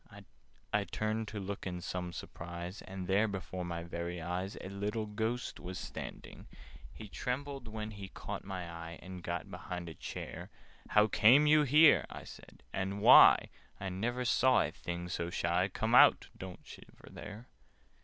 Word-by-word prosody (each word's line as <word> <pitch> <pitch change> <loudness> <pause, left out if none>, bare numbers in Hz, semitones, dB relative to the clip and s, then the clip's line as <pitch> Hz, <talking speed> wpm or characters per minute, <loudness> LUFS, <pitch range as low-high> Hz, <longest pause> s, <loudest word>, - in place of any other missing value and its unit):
I - - +3
turned 110 +1 -2
to 105 0 -5
look 100 0 -5
in 90 -1 -4
some 90 0 -4
surprise, 85 +3 -7
And 95 -1 -7
there, 100 +4 +3
before 95 -2 -5
my 85 -1 -4
very 85 +1 -5
eyes, 90 +4 -4
A - - -7
little 105 +3 -3
Ghost 110 +3 -3
was 90 +1 -6
standing! - - -8 0.4
He 110 - -10
trembled 135 +4 -4
when 110 0 -5
he 100 -2 -8
caught - - -7
my 95 -3 -5
eye, 85 0 -8
And 90 0 -8
got 85 -1 -4
behind 90 -1 -6
a - - -8
chair. - - -7 0.4
"How 105 0 +5
came 115 +7 +6
you 150 0 +6
here," 150 +2 +6
I - - -8
said, - - -13
"and 95 +2 -2
why? - - +8 0.3
I 95 - -3
never 120 +7 -2
saw 130 +1 +4
a - - -3
thing 85 0 -5
so 85 -1 -3
shy. 85 +1 +1
Come 110 +4 -2
out! 125 - +7
Don't 95 -1 -9
shiver - - -14
there!" 105 +4 -9
95 Hz, 165 wpm, -33 LUFS, 90-110 Hz, 0.4 s, why